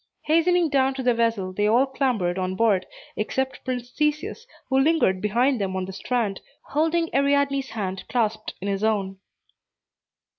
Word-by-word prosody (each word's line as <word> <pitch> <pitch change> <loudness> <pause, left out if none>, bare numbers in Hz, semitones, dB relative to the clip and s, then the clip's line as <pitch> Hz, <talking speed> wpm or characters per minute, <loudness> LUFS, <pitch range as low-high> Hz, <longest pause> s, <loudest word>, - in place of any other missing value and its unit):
Hastening 335 +2 +3
down 270 -1 +2
to 265 - -4
the 245 -1 +3
vessel, 230 -5 0
they 205 +2 +1
all 240 +5 +4
clambered 240 -10 -1
on 185 0 -2
board, 195 -3 +2 0.3
except 265 +5 -2
Prince 250 -1 -4
Theseus, 300 - -2 0.2
who 265 0 +2
lingered 270 - +2
behind 240 +4 +1
them 190 -1 -2
on 185 0 -2
the 190 - -8
strand, 210 0 -2 0.2
holding 325 +2 0
Ariadne's 280 -1 +2
hand 195 -3 -4
clasped 220 -3 -1
in 195 - -5
his 200 +1 -1
own. 195 -3 0
240 Hz, 155 wpm, -24 LUFS, 195-275 Hz, 0.3 s, all